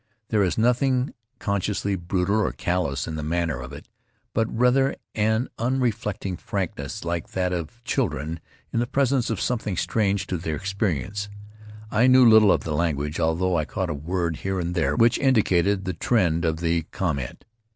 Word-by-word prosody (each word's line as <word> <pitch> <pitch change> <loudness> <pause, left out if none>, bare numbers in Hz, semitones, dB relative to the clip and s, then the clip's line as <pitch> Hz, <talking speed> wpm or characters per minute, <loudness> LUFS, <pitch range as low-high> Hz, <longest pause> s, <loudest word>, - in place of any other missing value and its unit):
There 110 -2 +2
is 90 -4 +1
nothing 125 +3 +2 0.2
con 100 -3 -1
sciously 100 0 -1
brutal 90 +3 0
or 110 - +1
callous 80 -7 -1
in 80 - -4
the - - -3
manner 80 -2 -1
of 60 +1 -8
it, 70 - -10 0.5
but, 115 - +1
rather 125 +3 +3 0.2
an 110 +3 +1
unreflecting 115 -6 -1
frankness 85 -7 -4
like 85 0 -3
that 90 -1 0
of 90 +7 -5
children 80 - -1 0.3
in 115 - +1
the 120 - 0
presence 135 -2 +1
of 110 -4 -1
something 110 -6 -1
strange 100 -2 +1
to 95 -2 -2
their 80 -1 -3
experience. 100 - -2 0.6
I 115 +4 +4
knew 130 -1 +7
little 110 -3 +7
of - - +1
the 80 - -3
language, 75 -1 -1
although 85 +3 +1
I 80 -2 +1
caught 95 0 -3
a - - -1
word 85 +2 -2
here 95 -1 -2
and 85 0 -2
there 85 -3 +1
which 115 0 +4
indicated 100 -7 +2
the 90 - -1
trend 85 -3 +1
of 80 0 -1
the 85 0 +1
com 85 -7 -1
ment. - - -7
95 Hz, 180 wpm, -24 LUFS, 85-110 Hz, 0.6 s, knew